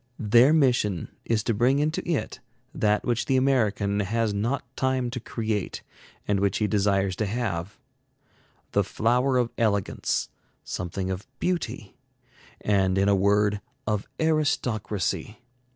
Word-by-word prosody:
Their 115 +6 +5
mission 120 - +2 0.2
is 110 -2 +1
to 115 - 0
bring 125 +6 +3
into 155 +2 0
it 165 - -2 0.3
that 105 -6 +1
which 120 -1 0
the 135 - +3
American 105 -6 +1
has 110 +2 0
not 115 +7 -1
time 130 -2 0
to 125 - -4
create, 110 -4 -3 0.4
and 100 -1 +2
which 100 -1 +1
he 105 - +1
desires 100 -2 +1
to 110 - 0
have: 100 -4 -3 0.9
the - - +3
flower 125 +4 +1
of 120 -2 +1
elegance, 100 -4 0 0.3
something 95 +1 -4
of 95 +1 -5
beauty, 130 - -3 0.6
and 95 -2 +2
in 100 +1 +3
a 100 - +5
word, 100 +1 +2 0.2
of 105 -1 -1
aristocracy. 110 - 0
110 Hz, 135 wpm, -26 LUFS, 100-125 Hz, 0.9 s, Their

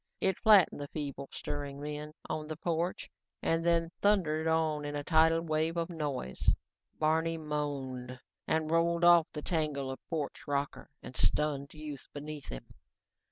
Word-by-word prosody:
It 190 -1 +1
flattened 210 -9 +6
the 145 - -4
feebly 140 -2 -5
stirring 145 -1 -5
men 150 +1 -5
on 155 -1 -3
the 155 -1 -5
porch 170 +2 -1 0.4
and 165 0 +2
then 170 -1 +2
thundered 165 -6 +3
on 160 -2 +2
in 145 0 -4
a 145 - -2
tidal 160 +1 +4
wave 160 +1 0
of 170 +1 -1
noise. 145 - -1 0.5
Barney 160 +1 +2
moaned 140 -5 -3 0.3
and 155 0 +1
rolled 170 +1 +2
off 175 -2 +7
the 150 - -6
tangle 150 -5 -1
of 130 - -6
porch 155 -4 -3
rocker 140 0 -2
and 125 - -9
stunned 140 - 0
youth 150 -3 -7
beneath 150 0 -6
him. - - -8
155 Hz, 155 wpm, -32 LUFS, 145-165 Hz, 0.5 s, off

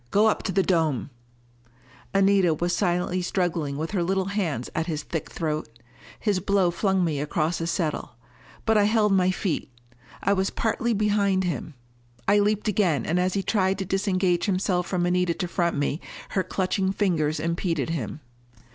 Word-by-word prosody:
Go 205 - +4
up 220 - +2
to 190 - -2
the 190 +1 +2
dome 160 -8 +1 0.5
" 120 +2 -28
Anita 195 -4 +4
was 175 +3 0
silently 180 -1 0
struggling 170 -6 -1
with 160 +2 -3
her 195 -4 0
little 190 +2 0
hands 165 - -1
at 160 - -1
his 155 -3 -3
thick 160 - -4
throat. 155 -5 -3 0.5
His 205 -4 +1
blow 195 -1 +2
flung 190 +1 +1
me 155 -4 -1
against 155 +3 -1
a 165 - -1
settle. 160 -7 -2 0.5
But 220 -1 +4
I 205 - +4
held 210 -1 +3
my 185 -1 +3
feet. 185 -7 -2 0.5
I 200 - +3
was 190 0 +1
partly 230 +1 0
behind 200 -2 +2
him. 160 -4 -3 0.5
I 205 +1 +5
leaped 210 +1 +1
again, 190 -7 +1
and 170 +3 +1
as 185 +1 +1
he 195 - 0
tried 190 -2 +1
to 195 - -3
disengage 190 -2 +1
himself 185 -2 0
from 180 -2 0
Anita 180 -1 +1
to 180 - -2
front 170 -2 0
me, 145 +2 -1 0.3
her 190 - 0
clutching 190 +1 0
fingers 165 -7 0
impeded 165 -3 -1
him. 155 -2 -4
180 Hz, 175 wpm, -25 LUFS, 165-195 Hz, 0.5 s, I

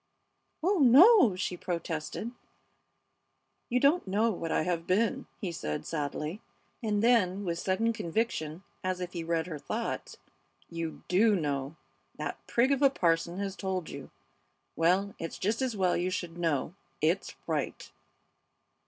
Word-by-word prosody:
"Oh 380 +2 +3
no!" 285 - +7
she 180 0 -2
protested. 170 +4 -4 1.4
"You 250 - +2
don't 285 - +3
know 215 +4 +2
what 165 -4 -4
I - - +2
have 170 -1 -2
been," 230 +8 +1
he 190 -6 -3
said, 75 - -4
sadly, 150 +5 -3 0.4
and 210 -2 0
then 205 -5 +3
with 170 -1 -2
sudden 225 +6 +1
conviction, 185 -5 -2 0.2
as 185 0 -1
if 180 -1 -5
he 170 -2 -3
read 165 -1 0
her 160 -4 -6
thoughts: - - -4 0.5
"You 165 -1 -5
do 210 +4 +4
know! 145 -3 -2 0.4
That - - -4
prig 250 +3 +3
of 275 0 +2
a 275 - +7
parson 170 -6 +1
has 195 -1 -3
told 185 -4 -3
you! 140 -1 -8 0.7
Well, 185 +5 +2
it's 165 - -5
just 215 +5 0
as 250 -5 -1
well 185 -2 +2
you 180 +1 0
should 175 -2 -4
know. 165 -3 -1 0.3
It's 165 +5 0
right!" - - -3
185 Hz, 145 wpm, -30 LUFS, 165-225 Hz, 1.4 s, no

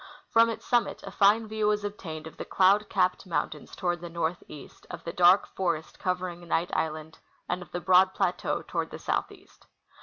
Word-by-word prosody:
From 230 0 +5
its 225 - -6
summit 240 -1 0
a - - -7
fine 215 +2 +4
view 215 0 -1
Avas 210 0 +1
obtained 165 -7 -6
of 160 - -11
the - - -4
cloud 200 +2 +3
capped 185 0 +1
mountains 155 -3 -3
tOAvard 175 -1 -1
the 175 - -7
northeast, 165 -3 -5
of - - -8
the 170 - -5
dark 180 +2 +6
forest 170 -4 -2
covering 180 -1 -3
Knight 170 +1 0
island, 155 0 -3 0.3
and 180 +1 -2
of 180 - -12
the 175 - -4
broad 185 +1 +5
plateau - - -1
toAvard - - -3
the - - -8
southeast. - - -5
180 Hz, 185 wpm, -28 LUFS, 170-200 Hz, 0.3 s, dark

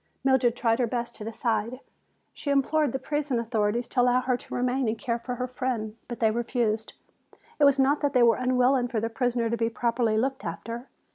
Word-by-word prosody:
Mildred 265 -3 +3
tried 230 -1 +1
her 245 - +2
best 240 0 -3
to 215 - -9
decide. 225 +1 -2 0.5
She 285 - -6
implored 280 +1 +2
the 265 - -1
prison 290 -1 -2
authorities 230 0 0
to 250 - +2
allow 250 +1 +3
her 255 0 +1
to - - -9
remain 250 +1 0
and 220 +1 -1
care 235 -1 -2
for 250 +1 -5
her 250 - -2
friend. 245 -4 -3
But 240 - -6
they 220 -2 +3
refused. 230 -1 -1 0.7
It 290 - +6
was 280 0 +5
not 275 +2 +3
that 285 -2 0
they 250 -2 +5
were 230 -1 +5
unwilling 255 0 +2
for 235 -3 -2
their 225 +1 -2
prisoner 240 -1 0
to 235 +1 -1
be 230 0 +1
properly 230 -1 0
looked 265 +4 -1
after. 230 +9 -6
245 Hz, 210 wpm, -27 LUFS, 230-260 Hz, 0.7 s, It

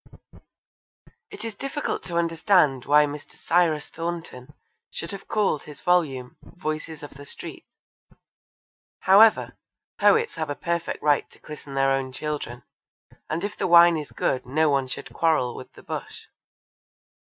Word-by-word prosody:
It 210 - -9
is 225 - -4
difficult 275 +7 -3
to 170 -2 -3
understand 165 -5 +2
why 150 +2 +5
Mr. 145 0 -8
Cyrus 165 -3 +1
Thornton 165 -6 -6 0.4
should - - -6
have 200 - -8
called 205 -9 +1
his 150 - -11
volume 145 -9 0
Voices 155 -2 -6
of 145 - -8
the 140 +1 -12
Street. 145 - -8 1.3
However, 210 +4 +5 0.4
poets 460 +1 +3
have 155 -2 -3
a 145 - -2
perfect 170 -1 -3
right 145 -1 +2
to - - -17
christen 145 -2 -10
their 135 0 +3
own 135 -1 -1
children, 130 -4 -5 0.7
and 165 +4 -2
if 205 0 -3
the - - -1
wine 170 0 +7
is 150 -2 -5
good 130 - -1
no 150 +4 +1
one 135 -2 +1
should - - -7
quarrel 155 -7 +1
with - - -10
the - - -15
bush. - - -6
155 Hz, 145 wpm, -25 LUFS, 140-175 Hz, 1.3 s, wine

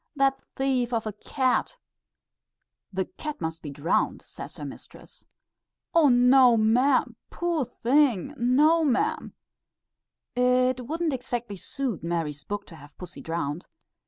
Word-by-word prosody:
That 270 -1 +2
thief 255 -3 0
of 225 -1 0
a 215 - -3
cat 260 - -1 0.6
" - - -59
"The 190 -1 -1
cat 300 -1 -7
must 160 0 -4
be 150 - -7
drowned," 145 +4 0
says - - -10
her - - -6
mistress. - - -12 0.7
"Oh, 325 -4 +5
no, 250 0 +6
ma'am! 245 +5 +2
Poor 345 -4 -1
thing! 265 -1 +1
no, 295 +6 +4
ma'am." 265 -5 0 1.0
It 250 0 +2
wouldn't 325 +1 -1
exactly 240 -5 -4
suit 245 - -4
Mary's 165 -4 -3
book 205 0 -5
to 165 - -13
have 145 0 -16
pussy 180 -1 -9
drowned. 165 -1 -4
245 Hz, 130 wpm, -26 LUFS, 185-270 Hz, 1.0 s, no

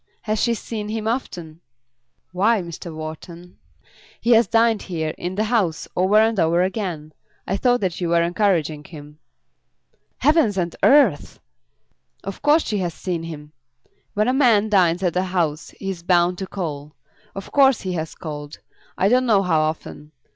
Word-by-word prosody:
Has 215 0 -1
she 235 -1 +2
seen 210 -1 -6
him 220 0 -3
often?" 175 -9 -4 0.7
"Why, 200 +3 +2
Mr. 170 0 -8
Wharton, 160 +3 -9 0.6
he 235 - 0
has 230 0 +5
dined 225 -2 +2
here, 160 -4 -3
in 180 +1 -5
the 210 - 0
house, 210 -8 0
over 185 +3 +2
and 220 -1 +4
over 170 +2 +3
again. 180 -6 -4 0.3
I 195 - -1
thought 245 +4 +2
that 185 -2 -2
you 175 - -1
were 170 0 +3
encouraging 170 -5 0
him." 150 -2 -12 1.0
"Heavens 295 - +2
and 175 -2 -2
earth!" 290 +1 +3 0.8
"Of 195 -1 -7
course 300 +2 +4
she 210 -2 -2
has 175 -3 -3
seen 175 -3 -3
him. 150 -3 -9 0.6
When 210 +2 +1
a 255 - +2
man 230 -6 +3
dines 180 -3 +2
at 180 -2 0
a 180 - +2
house 165 -4 -2
he 195 - -3
is 175 -3 -8
bound 175 0 +2
to 190 - -4
call. 150 -6 -6 0.4
Of 195 - -8
course 270 -3 +4
he 185 -1 -3
has 160 -2 -4
called, 150 -2 -8 0.4
I 190 - +2
don't 250 +3 +3
know 205 -4 +4
how 165 -4 +2
often. 155 -1 -4
185 Hz, 170 wpm, -21 LUFS, 165-215 Hz, 1.0 s, has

